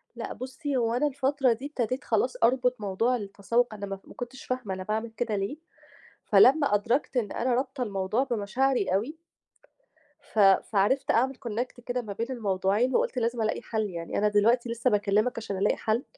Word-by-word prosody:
لأ 230 - -5
بُصّي، 265 +2 -4
هو 230 -2 +1
أنا 265 +5 +2
الفترة 270 -2 +1
دي 240 +5 -8
ابتديت 255 -2 -2
خلاص - - 0
أربُط 250 -1 +2
موضوع 210 +5 +1
التسوُّق 215 +2 -1
أنا 205 -1 -6
ما 195 -1 -6
ما - - -13
كنتش 245 +2 -8
فاهمة 250 -6 -3
أنا 185 0 -5
باعمل 220 +3 -2
كده 225 -1 -2
ليه، 200 +8 -3 0.7
فلمّا 280 -4 +5
أدركت 235 +7 0
إن 220 -5 0
أنا 250 +1 0
رابطة 260 +1 -2
الموضوع 205 +3 0
بمشاعري 240 -2 0
أوي 245 +12 -2 1.0
ف 220 - -5
فعرفت 200 +5 +3
أعمل 260 +3 +2
Connect 245 +3 -4
كده 250 0 -2
ما 210 -4 -6
بين 230 +4 -3
الموضوعين 210 +1 0
وقُلت - - +1
لازم 235 -1 0
ألاقي 220 +1 -1
حَل، 220 -3 -2
يعني 170 -2 -5
أنا 210 - +3
دلوقتي 230 +4 +3
لسّه 235 0 0
باكِّلمِك 210 +3 +2
عشان 215 -3 -4
ألاقي 200 +2 +1
حَل. 225 +4 0
230 Hz, 180 wpm, -27 LUFS, 205-255 Hz, 1.0 s, فلمّا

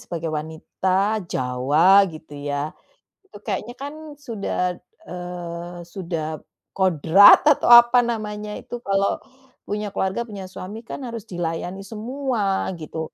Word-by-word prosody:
sebagai 165 -2 -5
wanita 185 +7 -1
Jawa 140 +10 +4
gitu 155 -2 -12 0.2
ya. 145 +2 -2 0.5
Itu 390 - -15
kayaknya 240 +3 -3
kan 285 +2 -6 0.2
sudah, 200 -8 -2 0.3
eee, 175 -1 -7
sudah, 165 -4 -5 0.3
kodrat 190 - +6
atau 300 -5 +4
apa 240 +1 +8
namanya 210 -3 -4
itu 240 -1 -8
kalau, 195 -1 0 0.5
punya 205 -1 -3
keluarga 190 +5 -1
punya 195 -4 -8
suami 205 +4 -8
kan 255 +2 -7
harus 230 -3 -8
dilayani 175 +2 -4
semua, 220 -3 -2
gitu. 160 +1 -6
190 Hz, 120 wpm, -22 LUFS, 170-220 Hz, 0.5 s, apa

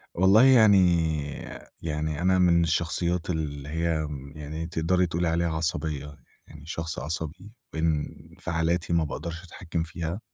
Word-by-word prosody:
والله 95 +6 +6
يعني 115 -6 +7 1.0
يعني 75 0 -2
أنا 95 +1 +3
من 85 -2 +4
الشخصيات 85 +1 0
اللي 75 -4 -3
هي 80 +2 -1
امم 70 -2 -7
يعني 75 +2 -5
تقدري 90 +3 +1
تقولي 85 +1 -1
عليها 85 +1 +1
عصبية، 75 -3 -2 0.3
يعني 75 -2 -13
شخص 80 0 -4
عصبي، 80 +6 -5 0.2
وانفعالاتي 80 +2 -1
ما 85 -1 +3
باقدرش 85 +3 -5
أتحكم 85 -1 -4
فيها. 85 +2 -4
80 Hz, 130 wpm, -26 LUFS, 80-85 Hz, 1.0 s, يعني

